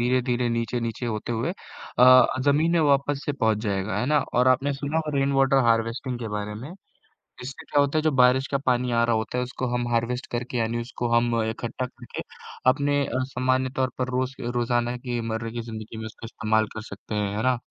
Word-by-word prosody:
धीरे-धीरे 125 0 +1
नीचे-नीचे 115 0 -2
होते 110 +1 -3
हुए 115 +8 -1 0.5
अ, 130 +1 +8 0.2
ज़मीन 155 +4 +3
में 170 - +3
वापस 140 -1 +2
से 145 - -1
पहुँच 110 -6 +1
जाएगा, 100 0 -1
है 125 - 0
ना? 150 +1 +3 0.2
और 125 +1 +4
आपने 135 +2 +2
सुना 140 +3 -3
होगा 155 -3 -1
रेन 135 0 +2
वाटर 135 0 +3
हार्वेस्टिंग 115 +2 0
के 115 - -5
बारे 105 0 -4
में, 130 +9 -8 0.7
इससे 130 +2 -7
क्या 145 - +3
होता 140 +2 +1
है - - +3
जो 155 0 +2
बारिश 130 +1 +5
का 140 - 0
पानी 125 -1 +2
आ 115 0 +3
रहा 115 -1 +2
होता 110 +3 -2
है, 125 - +1
उसको 130 +1 -4
हम 120 0 0
हार्वेस्ट 120 +2 0
करके 125 +1 -3
यानी 115 0 0
उसको 120 0 -4
हम 120 0 +3 0.2
इकट्ठा 120 +3 -4
करके 120 -1 -8 0.5
अपने 145 +1 +2
अ, 130 +1 -1
सामान्य 130 0 0
तौर 130 -1 +1
पर 125 - -1
रोज़ 130 +1 -1 0.2
रोज़ाना 120 0 0
की 120 -1 -3
मर्रे 115 0 -3
की 120 +1 -4
ज़िंदगी 110 -1 -8
में 110 - -5
उसका 110 +1 -9
इस्तेमाल 110 -1 +1
कर 110 - -5
सकते 110 - -7
हैं, 100 -1 -1
है 110 - -1
ना? 130 -1 +3
125 Hz, 215 wpm, -25 LUFS, 115-130 Hz, 0.7 s, अ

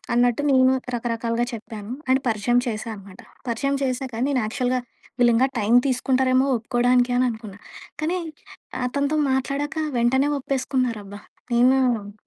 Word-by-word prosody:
అన్నట్టు 245 +3 +2
నేను 260 -1 +5 0.2
రకరకాలుగా 230 0 -1
చెప్పాను. 220 0 -7 0.2
అండ్ 265 +1 +3
పరిచయం 230 +3 +2
చేశా 220 0 -3
అనమాట. 195 -1 -14 0.3
పరిచయం 275 +4 0
చేశాక 255 -1 -2 0.2
నేను 265 -3 +1
యాక్చువల్‌గా 250 +3 -1 0.4
వీళ్ళింగా 240 +1 +4
టైం 215 +2 +1
తీసుకుంటారేమో 255 0 +2
ఒప్పుకోడానికి 245 +2 +2
అని 255 - +3
అనుకున్నా. 220 -3 -8 0.4
కానీ 340 +4 0 0.7
అతనితో 280 +4 -1
మాట్లాడాక 275 +3 -2 0.2
వెంటనే 265 +4 +2
ఒప్పేసుకున్నారబ్బా! 250 -7 -2 0.3
హ్మ్. 245 -4 +2
245 Hz, 115 wpm, -23 LUFS, 230-265 Hz, 0.7 s, నేను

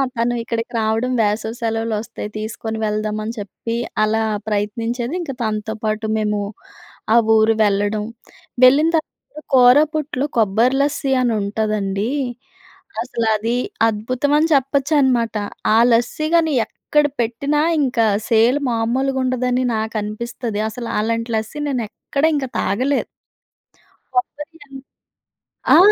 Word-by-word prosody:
తను 235 +1 0
ఇక్కడికి 230 0 -4
రావడం 225 +3 0
వేసవి 215 +2 -1
సెలవులు 225 0 -1
వస్తాయి 220 -1 -7
తీసుకొని 220 +1 -4
వెళ్దామని 215 +1 -2
చెప్పి 210 +3 -5 0.3
అలా 220 +1 +1 0.3
ప్రయత్నించేది. 225 +5 -2
ఇంక 305 -5 -4
తనతో 215 -1 -2
పాటు 215 0 -1
మేము, 210 -1 0 0.7
ఆ - - +5 0.2
ఊరు 220 0 +4
వెళ్ళడం. 205 +1 +1 0.6
వెళ్ళిన 280 +5 +6
తర్వాత 305 -1 -8
కూరపుట్టు, 285 +2 +4
కొబ్బరి 225 +5 +3
లస్సీ 280 -1 0
అని 240 -2 +1
ఉంటుందండి. 205 0 -1 0.9
అసలు 235 -2 -2
అది 225 +3 -1 0.3
అద్భుతం 245 +7 -1
అని 320 +2 +2
చెప్పొచ్చనమాట. 270 -4 +2 0.4
ఆ - - +5
లస్సీ 245 +6 +1
గాని 320 -2 +3
ఎక్కడ 295 0 0 0.2
పెట్టినా 280 +6 0 0.2
ఇంకా 245 -4 +2 0.2
సేల్ 235 +5 +4
మామూలుగా 255 +4 0
ఉండదని 255 0 0
నాకు 220 0 -2
అనిపిస్తది. 225 0 -4
అసలు 230 +1 -6
అలాంటి 230 +2 -1
లస్సీ 220 +7 -4
నేను 250 -4 -1
ఎక్కడ 280 +6 -4
ఇంక 280 -2 -1
తాగలే. 260 +8 +1 1.2
కొబ్బరి 325 -3 -3 1.2
ఆ! - - +8
230 Hz, 115 wpm, -20 LUFS, 215-265 Hz, 1.2 s, ఆ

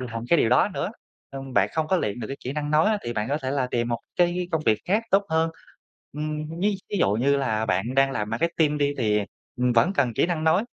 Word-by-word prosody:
làm 115 -2 -5
cái 170 - +4
điều 115 - +3
đó 125 - +4
nữa, - - -2 0.4
ừm, 135 -1 -8
bạn 100 0 +4
không 160 -1 -1
có 190 - +3
luyện 105 - -2
được 110 - -4
cái 135 - -5
kỹ 130 - -3
năng 150 0 -3
nói 155 +4 +4
á, 215 -1 +2
thì 120 - -4
bạn 105 -1 -2
có 145 +2 0
thể 130 - -2
là 135 -2 0
tìm 120 0 0
một 120 -1 -2 0.2
cái 175 0 +1
công 160 -1 0
việc 110 -2 +4
khác 210 +5 +2
tốt 200 +1 +4
hơn. 160 +1 +2 0.6
Ừm, 155 +2 -4
ví 205 +1 +2 0.2
thí - - -1
dụ 100 - +3
như 135 +6 +2
là 110 -5 -1
bạn 100 +6 -1
đang 135 0 +4
làm 105 -5 -3
marketing 150 +4 +1
đi, 145 0 +1
thì, 105 -3 +2 0.4
ừm, 125 0 +1
vẫn 120 +11 +3
cần 135 -10 +1
kỹ - - +2
năng 165 -3 -2
nói, 160 +7 +3
140 Hz, 260 wpm, -25 LUFS, 120-160 Hz, 0.6 s, cái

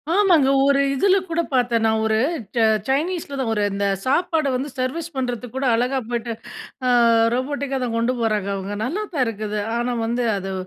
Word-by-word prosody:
ஆமாங்க 350 -9 +4 0.2
ஒரு 280 0 +4
இதில 385 +7 +3
கூட 335 +1 +1
பாத்தேன். 240 -3 +2
நான் 220 0 +2
ஒரு 220 0 +2 0.4
ச்ச 235 - +1 0.3
சைனீஸ்ல 295 +1 -1
தான். 250 - -1
ஒரு 210 - 0
இந்த 200 0 -1 0.2
சாப்பாடு 315 +2 +1
வந்து 265 +3 -3
சர்வீஸ் 310 +6 -2
பண்றதுக்கு 245 -2 -4
கூட, 265 +1 -1
அழகா 250 +3 0
போயிட்டு, 235 -1 -2 0.5
அ - - +2 0.5
ரோபோட்டிக்கா 270 +1 -2
தான் 230 - -3
கொண்டு 235 +2 +1
போறாங்க 210 -3 0
அவுங்க. 195 +1 -4
நல்லா 350 - -2
தான் 275 -5 +1
இருக்குது. 215 -1 -3 0.2
ஆனா 245 +1 -1
வந்து, 240 +1 -1
அது 195 0 -4
250 Hz, 175 wpm, -22 LUFS, 225-280 Hz, 0.5 s, ஆமாங்க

